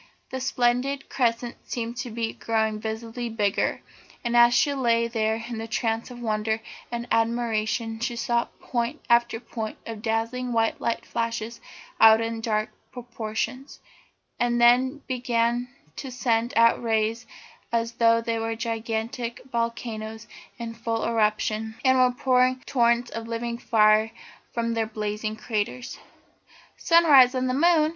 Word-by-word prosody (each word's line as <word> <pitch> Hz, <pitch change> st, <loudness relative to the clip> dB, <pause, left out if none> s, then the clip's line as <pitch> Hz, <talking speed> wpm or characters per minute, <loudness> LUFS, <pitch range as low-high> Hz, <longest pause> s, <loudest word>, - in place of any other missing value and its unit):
The 260 Hz, -, -3 dB
splendid 260 Hz, +1 st, 0 dB
crescent 235 Hz, -1 st, 0 dB
seemed 235 Hz, -1 st, -3 dB
to 250 Hz, -1 st, -4 dB
be 225 Hz, 0 st, -3 dB
growing 220 Hz, -1 st, -1 dB
visibly 225 Hz, +2 st, -4 dB
bigger, 210 Hz, -3 st, 0 dB, 0.4 s
and 240 Hz, -1 st, -1 dB
as 240 Hz, 0 st, +7 dB
she 260 Hz, +4 st, +3 dB
lay 235 Hz, -3 st, +2 dB
there 220 Hz, -1 st, -1 dB
in 235 Hz, -2 st, -5 dB
a 225 Hz, -, -5 dB
trance 225 Hz, +1 st, -1 dB
of 245 Hz, -1 st, -10 dB
wonder 220 Hz, -1 st, -1 dB, 0.3 s
and 235 Hz, 0 st, -4 dB
admiration 225 Hz, -1 st, 0 dB
she 240 Hz, +1 st, -2 dB
saw 235 Hz, 0 st, 0 dB
point 235 Hz, -2 st, -2 dB
after 235 Hz, -1 st, +3 dB
point 225 Hz, -2 st, -6 dB
of 225 Hz, -2 st, -7 dB
dazzling 230 Hz, +3 st, -1 dB
white 225 Hz, -1 st, +1 dB
light 235 Hz, -, -1 dB
flash 230 Hz, -1 st, -2 dB, 0.6 s
out 220 Hz, 0 st, +8 dB
in 230 Hz, 0 st, -2 dB
the -, -, -6 dB
dark 215 Hz, -1 st, -1 dB, 0.4 s
portions, 225 Hz, +5 st, -4 dB, 0.6 s
and 240 Hz, -1 st, +1 dB
then 255 Hz, +4 st, +4 dB
begin 240 Hz, -1 st, 0 dB, 0.3 s
to 270 Hz, -, -5 dB
send 240 Hz, -2 st, 0 dB
out 230 Hz, 0 st, +5 dB
rays 225 Hz, 0 st, 0 dB, 0.4 s
as 230 Hz, 0 st, 0 dB
though 230 Hz, 0 st, +3 dB
they 230 Hz, 0 st, -2 dB
were 225 Hz, 0 st, -2 dB
gigantic 230 Hz, +1 st, -3 dB
volcanoes 230 Hz, -2 st, -3 dB, 0.3 s
in 230 Hz, -1 st, -5 dB
full 225 Hz, 0 st, -2 dB
eruption, 220 Hz, 0 st, 0 dB
and 260 Hz, 0 st, +5 dB
were 255 Hz, -1 st, +5 dB
pouring 255 Hz, 0 st, +2 dB
torrents 235 Hz, -2 st, +2 dB
of 230 Hz, 0 st, -6 dB
living 235 Hz, +1 st, -3 dB
fire 215 Hz, -1 st, +4 dB, 0.4 s
from 230 Hz, -1 st, -1 dB
their 225 Hz, -1 st, 0 dB
blazing 215 Hz, 0 st, -3 dB
craters. 220 Hz, +3 st, -3 dB, 0.8 s
"Sunrise 290 Hz, -7 st, +6 dB
on 255 Hz, 0 st, 0 dB
the 255 Hz, -, 0 dB
Moon!" 310 Hz, +2 st, +4 dB
230 Hz, 145 wpm, -25 LUFS, 225-245 Hz, 0.8 s, out